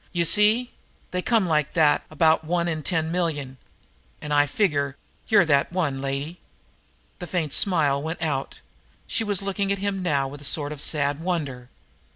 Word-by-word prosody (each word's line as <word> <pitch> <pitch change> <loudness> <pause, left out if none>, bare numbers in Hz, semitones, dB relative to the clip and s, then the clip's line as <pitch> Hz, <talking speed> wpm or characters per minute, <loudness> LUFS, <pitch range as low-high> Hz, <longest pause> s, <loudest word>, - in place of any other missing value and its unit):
You 170 -1 0
see? 215 +7 +3 0.4
They 180 - -1
come 225 -1 +2
like 150 -4 0
that 155 -4 +3
about 160 +1 +3
one 170 +2 0
in 160 -2 -2
ten 160 0 0
million, 150 -7 -2 0.6
and 150 - -4
I 145 0 +4
figure 140 -6 0 0.3
you're 205 -5 +5
that 140 -2 +2
one, 155 -7 -1
lady." 140 +5 -4 0.8
The 180 - -6
far 180 -1 0
away 155 - -4
smile 145 -5 +2
went 160 +3 -4
out. 145 -5 -3 0.4
She 225 - -1
was 205 -3 0
looking 195 0 -1
at 200 - +1
him 195 0 -2
now 145 -6 0
with 140 +1 -10
a - - -11
sort 145 0 0
of 150 -2 -7
sad 145 -1 +1
wonder. 145 -8 -3
160 Hz, 180 wpm, -24 LUFS, 145-180 Hz, 0.8 s, you're